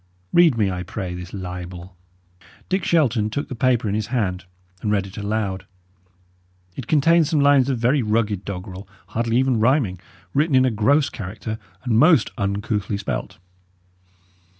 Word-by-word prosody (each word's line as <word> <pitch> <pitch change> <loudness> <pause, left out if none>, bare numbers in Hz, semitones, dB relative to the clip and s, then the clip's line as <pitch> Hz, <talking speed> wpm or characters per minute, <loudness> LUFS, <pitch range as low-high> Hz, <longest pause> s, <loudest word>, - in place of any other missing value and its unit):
Read 170 -8 +5
me, 100 -3 +1
I 90 0 -4
pray, 90 0 -5
this 90 0 -8
libel." 90 -1 -7 0.7
Dick 190 -1 0
Shelton 125 -10 +2
took 140 +7 -4
the - - -4
paper 120 -2 +1
in 100 - -1
his 105 0 -1
hand 95 -7 -2 0.4
and 105 - -1
read 100 -2 +1
it 95 0 -11
aloud. 100 -3 -3 1.1
It 125 - -7
contained 160 +2 +4
some 155 - +1
lines 140 -2 +4
of 130 - 0
very 125 +5 +2
rugged 105 -3 0
doggerel, 95 0 -7 0.2
hardly 115 +1 0
even 130 -3 +2
rhyming, 115 - +2 0.3
written 150 0 +2
in 130 0 +5
a 130 - +2
gross 135 +7 +2
character, 110 +1 -6 0.2
and 115 -3 +2
most 155 -1 +5
uncouthly 100 +1 -2
spelt. 65 -12 -4
110 Hz, 155 wpm, -22 LUFS, 95-130 Hz, 1.1 s, Read